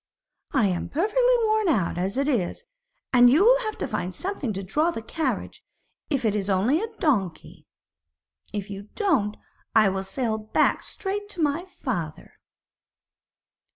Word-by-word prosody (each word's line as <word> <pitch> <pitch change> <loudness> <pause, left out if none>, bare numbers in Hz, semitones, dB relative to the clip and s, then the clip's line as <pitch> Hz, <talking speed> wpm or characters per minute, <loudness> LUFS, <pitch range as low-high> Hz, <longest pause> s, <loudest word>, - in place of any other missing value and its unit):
'I 265 -6 +3
am 180 -3 -1
perfectly 485 - +3
worn 435 -1 +2
out 190 - +1
as 190 +6 -2
it 280 +1 +1
is, 240 - -1 0.5
and 245 -1 +8
you 315 +11 +5
will - - +6
have 435 -3 -4
to - - -2
find 180 0 -3
something 360 - -3
to 195 0 -4
draw 300 - +1
the 335 - -3
carriage, 320 +7 -3 0.5
if 275 -6 0
it 215 - +2
is 205 -1 -1
only 220 - +2
a 450 - -2
donkey. 210 - -1 0.8
If 205 -1 -5
you 200 +1 -8
don't, 275 - +1 0.4
I 215 -3 +6
will 190 0 -2
sail 220 +3 -2
back 215 0 +1
straight 410 +1 -5
to 355 -5 -2
my 300 +4 0
father.' 215 - -5
255 Hz, 155 wpm, -25 LUFS, -, 0.8 s, and